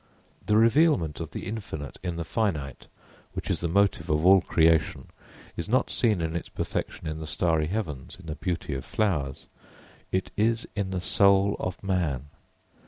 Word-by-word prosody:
The 105 - +4
revealment 115 - +3
of - - -5
the - - -6
infinite 95 -9 -6
in 90 -2 -3
the 85 - -3
finite, 80 -8 -2 0.5
which - - -4
is - - +1
the 85 - -1
motive 95 -2 +1
of 75 +2 +1
all 95 0 +7
creation, 80 -2 +2 0.5
is 85 - -4
not 130 +3 +2
seen 110 -7 +2
in 80 0 -2
its 85 - -4
perfection - - -4
in 80 0 -3
the 80 - -6
starry 80 -1 +1
heavens, 80 -10 -4
in 95 - -13
the 80 - -4
beauty 85 -3 -3
of 65 - -4
flowers. 75 -11 -1 0.7
It 95 0 -1
is 115 +2 +1
in 100 -3 -1
the 95 -2 -2
soul 100 +2 +4
of 90 +1 -4
man. 80 -8 -1
90 Hz, 170 wpm, -27 LUFS, 80-100 Hz, 0.7 s, all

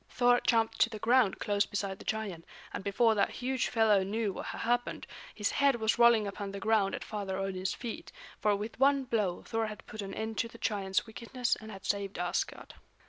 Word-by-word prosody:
Thor 245 0 +3
jumped 225 -2 +2
to 230 - +5
the 220 - -6
ground 235 -1 +3
close 205 -1 +1
beside 200 -2 -3
the - - -11
giant, 205 -6 -3 0.3
and - - -4
before 220 +3 +3
that 205 - +2
huge 260 0 -1
fellow 220 -4 +4
knew 205 +1 -1
what - - -6
had - - -5
happened, 240 +1 0 0.3
his 210 -2 0
head 280 -2 +3
was 220 0 0
rolling 235 -2 +6
upon 200 0 -5
the 200 - -6
ground 210 -2 +2
at - - -6
Father 200 -3 -4
Odin's 190 -1 -2
feet; 235 -2 -6 0.3
for 210 -1 +3
with 215 +3 -6
one 275 0 +4
blow 210 -8 -1
Thor 225 -1 -1
had 215 -1 -8
put 215 - -7
an 195 -1 -6
end 220 0 -3
to 230 - +1
the - - -13
giant's 195 -3 0
wickedness 235 +2 -2
and 220 - -11
had 195 -2 -10
saved 200 -1 -1
Asgard. 175 0 -2
215 Hz, 210 wpm, -31 LUFS, 200-230 Hz, 0.3 s, rolling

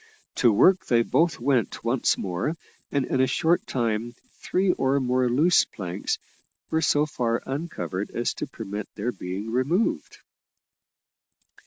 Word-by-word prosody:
To 120 - +5
work 185 - +4
they 115 -1 +4
both 160 +8 +1
went 125 -1 0
once 120 +2 +1
more, 95 - -2 0.3
and 140 -2 +1
in 130 - 0
a 130 - +4
short 170 +4 +1
time 115 -1 -1 0.2
three 185 0 0
more 130 -2 +1
loose 155 +9 +4
planks 95 -1 -4 0.5
were 160 - +2
so 150 -1 +3
far 120 -5 -1
uncovered 135 - -4
as 120 - -1
to - - -5
permit 105 -5 -6
of - - -64
their 110 +4 -2
being 100 +2 -5
removed. 140 - 0
125 Hz, 140 wpm, -25 LUFS, 110-150 Hz, 0.5 s, To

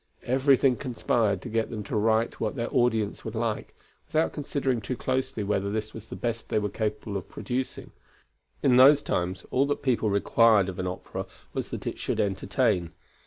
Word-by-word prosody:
Everything 130 0 +4
conspired 115 -6 0
to - - -6
get 115 0 0
them 110 -3 -5
to 100 - -5
write 110 +2 +1
what 110 +2 -1
their 115 -3 -3
audience 115 -4 +1
would 110 0 -6
like, 115 -1 -2 0.3
without 155 +1 +1
considering 135 -4 -1
too 125 - -3
closely 130 -4 -1
whether 100 -1 0
this 110 0 -3
was 110 0 -9
the - - -7
best 115 -1 -3
they - - +1
were 105 -1 0
capable 105 -1 -3
of 95 - -8
producing. 130 +1 -4 0.7
In 125 -3 +5
those 140 +3 +7
times 90 +2 -2
all 135 +2 +3
that 145 - -2
people 120 -5 +2
required 100 0 +4
of 95 0 -7
an 90 - -1
opera 90 - -5 0.3
was - - -3
that - - -6
it - - -4
should - - -2
entertain. 95 -3 0
115 Hz, 185 wpm, -27 LUFS, 105-130 Hz, 0.7 s, those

